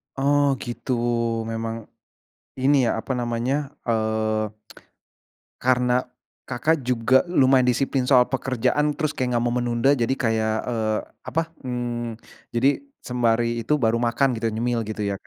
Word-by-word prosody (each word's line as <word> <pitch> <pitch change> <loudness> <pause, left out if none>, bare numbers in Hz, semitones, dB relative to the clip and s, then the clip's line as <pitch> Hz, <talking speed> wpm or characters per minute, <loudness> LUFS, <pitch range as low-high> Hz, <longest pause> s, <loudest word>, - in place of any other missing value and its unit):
Oh, 145 +1 +3 0.2
gitu. 120 +1 -5 0.6
Memang 115 0 -3 0.9
ini 145 +2 +4
ya - - +2
apa 130 - -4
namanya, 120 +2 -1 0.3
eee, 110 -1 0 1.2
karena, 125 -1 +3 0.6
Kakak, 150 +4 +1
juga 125 +1 +2
lumayan 130 -5 +4
disiplin 130 +1 +1
soal 125 -3 +6
pekerjaan 135 +3 0
terus 155 -2 0
kayak 130 - -1
enggak 120 - 0
mau 120 - 0
menunda. 120 +1 +1
Jadi 115 +3 +2
kayak, 110 -1 +1 0.2
eee, 110 -2 0 0.3
apa, 165 - +1 0.2
mmm, 120 -2 -4 0.4
jadi 125 +4 +3 0.4
sembari 120 -1 +2
itu 135 +7 0
baru 115 +1 +3
makan 120 +4 +2
gitu, 115 0 -1
nyemil 115 +2 -1
gitu 110 0 -4
ya, - - -1
120 Hz, 135 wpm, -23 LUFS, 115-130 Hz, 1.2 s, soal